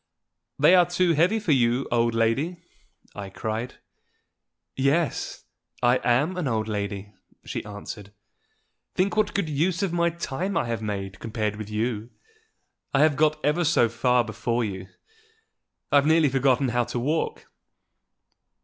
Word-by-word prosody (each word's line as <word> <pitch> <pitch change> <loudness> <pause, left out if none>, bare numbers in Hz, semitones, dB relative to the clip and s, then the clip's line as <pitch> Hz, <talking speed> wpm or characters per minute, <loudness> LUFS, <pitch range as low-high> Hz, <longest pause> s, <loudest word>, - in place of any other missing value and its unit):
"They 150 +5 +6
are 180 -2 +6
too 175 -1 +2
heavy 175 +8 +3
for 200 -7 -1
you, 125 -1 +2
old 115 -1 +2
lady," 130 +10 +1 0.6
I 100 -1 -7
cried. 110 +5 -4 1.0
"Yes; 140 +4 0 0.4
I 120 +1 +5
am 145 +10 +2
an 175 -6 -1
old 110 -3 -1
lady," 100 -1 -4 0.3
she - - -4
answered. 105 0 -8 0.8
"Think 190 +3 +1
what 215 -1 +1
good 200 -5 0
use 165 +5 0
of 185 -3 -1
my 170 0 +2
time 170 +3 -3
I - - +1
have 115 -1 -3
made 100 -3 -4
compared 110 -2 -2
with 105 -1 -7
you! 110 +1 -2 0.9
I 135 - +4
have 155 -2 +3
got 155 +1 +2
ever 150 +4 +2
so 145 -7 +3
far 125 +1 +2
before 115 +2 -2
you: 95 -2 -6 1.0
I've 145 0 +4
nearly 160 -2 +4
forgotten 135 0 +2
how 120 0 +1
to 120 +1 -5
walk!" 150 +7 -1
125 Hz, 145 wpm, -25 LUFS, 110-160 Hz, 1.0 s, They